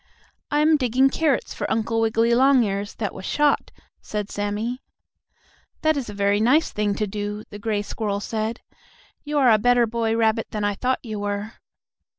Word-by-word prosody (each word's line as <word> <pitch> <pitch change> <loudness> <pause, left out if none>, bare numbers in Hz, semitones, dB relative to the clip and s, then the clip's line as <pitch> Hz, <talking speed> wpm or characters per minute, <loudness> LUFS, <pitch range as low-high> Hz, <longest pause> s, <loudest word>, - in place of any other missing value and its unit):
"I 295 0 +2
am 310 0 +4
digging 260 +1 +2
carrots 305 -4 0
for - - -4
Uncle 225 0 0
Wiggily 225 +1 +2
Longears 235 -6 +2
that 210 -3 -3
was 190 - -9
shot," 295 +7 +1 0.3
said 210 -1 -4
Sammie. 210 +5 -3 1.0
"That 315 0 +3
is 270 -6 -3
a - - -6
very 200 0 +2
nice 270 +9 +3
thing 210 -1 -1
to 215 - -1
do," 205 +1 -4
the 205 - -8
gray 210 -1 -1
squirrel 205 -1 -3
said. 220 +2 -3 0.6
"You 295 0 -2
are 260 -4 +5
a 215 - +5
better 245 +2 +4
boy 225 0 -1
rabbit 225 0 +1
than 210 -1 -4
I 205 0 +1
thought 255 +5 -2
you 215 -2 -5
were." 205 +2 -3
225 Hz, 175 wpm, -23 LUFS, 205-250 Hz, 1.0 s, are